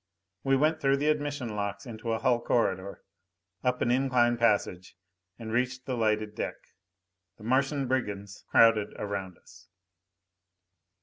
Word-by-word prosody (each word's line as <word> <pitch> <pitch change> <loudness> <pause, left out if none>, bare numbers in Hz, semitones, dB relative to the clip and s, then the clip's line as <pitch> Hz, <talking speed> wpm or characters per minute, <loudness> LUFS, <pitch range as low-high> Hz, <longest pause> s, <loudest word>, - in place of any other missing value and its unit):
We 135 0 +3
went 155 +3 +1
through 135 0 +3
the 150 +2 +1
admission 145 -4 -1
locks 105 +1 -4
into 115 -1 -5
a 115 - +1
hull 120 +1 +2
corridor, 100 -6 -1 0.6
up 125 0 +1
an 120 - +1
incline 125 -2 +3
passage, 100 -6 0 0.4
and 110 -1 -7
reached 125 +1 -1
the 130 - -2
lighted 110 -2 0
deck. - - -3 0.8
The 105 - -15
Martian 135 +3 +1
brigands 105 -6 -3
crowded 115 -2 +4
around 100 -3 -4
us. - - -18
120 Hz, 135 wpm, -28 LUFS, 105-130 Hz, 0.8 s, crowded